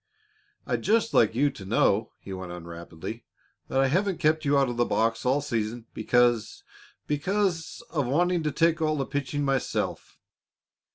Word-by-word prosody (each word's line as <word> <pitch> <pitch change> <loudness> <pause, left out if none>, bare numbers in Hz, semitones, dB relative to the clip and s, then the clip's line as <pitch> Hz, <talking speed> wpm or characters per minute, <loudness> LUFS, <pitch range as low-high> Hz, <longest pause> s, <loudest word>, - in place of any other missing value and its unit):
"I'd - - -1
just 225 +1 +2
like 110 0 +4
you 140 +3 +3
to 120 -8 -11
know," 105 +2 +2
he 95 - -9
went 95 -1 -6
on 85 -1 -8
rapidly, 85 +6 -8 0.4
"that 135 - 0
I 135 - +4
haven't 185 +5 +1
kept 155 0 +1
you 140 0 +3
out 135 -1 +3
of 120 - -3
the 120 - +2
box 115 +1 0
all 135 +3 +3
season 115 -3 -3
because 120 0 +1 0.4
because 180 +5 -1
of 145 -6 0
wanting 175 +6 +2
to 155 -1 -1
take 165 +1 +2
all 155 -1 +1
the 135 - -1
pitching 145 +1 -2
myself. 135 -2 -2
135 Hz, 170 wpm, -27 LUFS, 115-155 Hz, 0.4 s, like